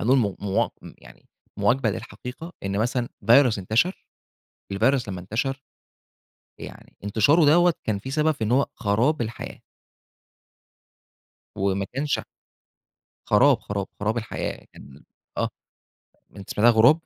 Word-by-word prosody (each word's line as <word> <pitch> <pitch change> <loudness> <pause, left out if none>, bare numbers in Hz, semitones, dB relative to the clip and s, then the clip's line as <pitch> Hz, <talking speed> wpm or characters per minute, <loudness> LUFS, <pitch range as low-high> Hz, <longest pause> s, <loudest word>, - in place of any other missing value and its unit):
هنقول 130 +5 +3
م 100 -6 0
موا 100 -1 0
م - - -11
يعني، - - -17 0.3
مواكبة 120 -3 +2
للحقيقة، 125 - -8
إن 100 +1 -2
مثلًا 120 +2 0 0.2
فيروس 120 -2 +6
انتشر، 110 - 0 0.7
الفيروس 120 +3 +1
لمّا 90 -2 -5
انتشر 125 +8 -2 1.0
يعني - - -11
انتشاره 120 +11 +4
دوّة، 170 +3 +5
كان 105 -2 -1
في 130 +6 -7
سبب 155 +2 +2
إن 110 +3 0
هو 135 +2 +3
خراب 120 +8 +1
الحياة. 115 +1 -7 2.0
وما 100 0 0
كانش 145 +2 0 1.1
خراب - - +5
خراب، 100 -1 -4
خراب 110 +3 0
الحياة 110 - -5
كان 70 +1 -14 0.4
آه - - +1 0.9
أنت 100 -1 -11
سمعتها 115 +3 +4
غراب؟ 120 +8 +5
115 Hz, 125 wpm, -24 LUFS, 100-135 Hz, 2.0 s, فيروس